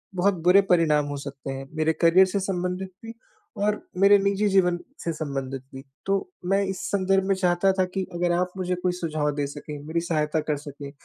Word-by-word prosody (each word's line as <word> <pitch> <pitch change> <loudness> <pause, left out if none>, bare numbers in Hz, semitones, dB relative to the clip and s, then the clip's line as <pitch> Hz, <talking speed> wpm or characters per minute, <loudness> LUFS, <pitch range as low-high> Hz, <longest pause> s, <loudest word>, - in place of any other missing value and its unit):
बहुत 190 +2 +2
बुरे 185 +3 +7
परिणाम 155 -4 +4
हो 145 0 -4
सकते 140 -1 -7
हैं, 135 0 -6
मेरे 160 +1 +2
करियर 175 +3 +6
से 200 +2 -1
संबंधित 185 0 -2 0.2
भी 225 - -7 0.5
और 210 0 +1 0.2
मेरे 200 +1 +7
निजी 200 +1 +1
जीवन 180 -3 +3 0.3
से 165 - -1
संबंधित 135 -4 -4
भी। 135 - -8 0.2
तो 195 - +3 0.4
मैं 200 +1 +4
इस 190 -1 -4
संदर्भ 195 -1 +2
में 195 - +4
चाहता 180 +1 +2
था 185 - +4
कि 190 -1 0
अगर 175 0 +1
आप 180 0 -1
मुझे 180 -1 -1
कोई 180 - +2
सुझाव 155 -4 -1
दे 145 -1 -1
सकें, 145 +1 -8
मेरी 165 +1 0
सहायता 155 -2 0
कर 150 - +1
सकें, 145 -1 -9
175 Hz, 200 wpm, -25 LUFS, 150-190 Hz, 0.5 s, बुरे